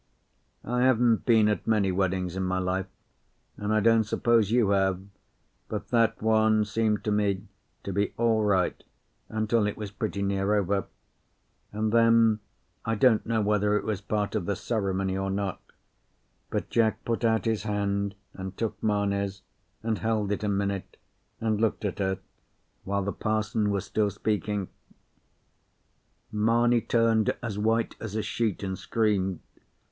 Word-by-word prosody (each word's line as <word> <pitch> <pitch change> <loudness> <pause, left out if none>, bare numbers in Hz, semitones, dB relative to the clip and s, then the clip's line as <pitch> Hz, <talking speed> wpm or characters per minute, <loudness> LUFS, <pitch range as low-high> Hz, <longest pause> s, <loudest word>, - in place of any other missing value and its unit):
I 125 +1 -1
haven't 120 -3 +3
been 110 -3 +5
at 105 - -1
many 105 -4 +2
weddings 90 -1 -1
in 95 - -2
my 95 0 0
life, 95 +1 -1 0.7
and 105 +1 -3
I 110 0 +3
don't 115 +1 +4
suppose 110 0 +2
you 115 -3 +3
have, 95 -2 +2 0.7
but - - -5
that 115 -2 +2
one 110 -1 +3
seemed 110 0 0
to 105 - -1
me 100 -2 +1 0.4
to 100 - -4
be 100 +1 0
all 115 -2 +2
right 95 -3 +1 0.5
until 110 0 +1
it 105 - -4
was 105 -2 -6
pretty 105 -2 -3
near 100 +1 +1
over; 100 -2 0 0.9
and 110 +1 -1
then, 115 -1 +5 0.4
I 115 0 0
don't 115 -1 +3
know 115 -1 +1
whether 105 0 +2
it - - -3
was 105 -2 -2
part 105 0 -2
of 105 -6 -2
the 100 - 0
ceremony 95 -3 -1
or 95 0 -2
not, 95 0 -2 0.9
but - - -3
Jack 110 -1 +1
put 115 0 -1
out 110 -3 +2
his 110 -2 0
hand 100 -1 -1 0.2
and 95 0 -7
took 115 -2 -3
Mamie's 100 -2 -1 0.4
and 110 -2 -1
held 110 -3 0
it 105 - -2
a 105 - 0
minute, 100 -1 -2 0.4
and 110 -1 0
looked 110 -1 0
at 100 - -3
her, 95 -1 0 0.7
while 100 0 -1
the 100 - -2
parson 110 -1 0
was 100 -1 -1
still 105 +1 +1
speaking. 105 -1 -2 1.6
Mamie 115 +3 +3
turned 115 -2 +2
as 105 -3 -3
white 115 +2 +1
as 110 -2 -6
a 110 - -1
sheet 110 -5 -1
and 95 -1 -2
screamed. 100 -5 0
105 Hz, 155 wpm, -27 LUFS, 100-110 Hz, 1.6 s, been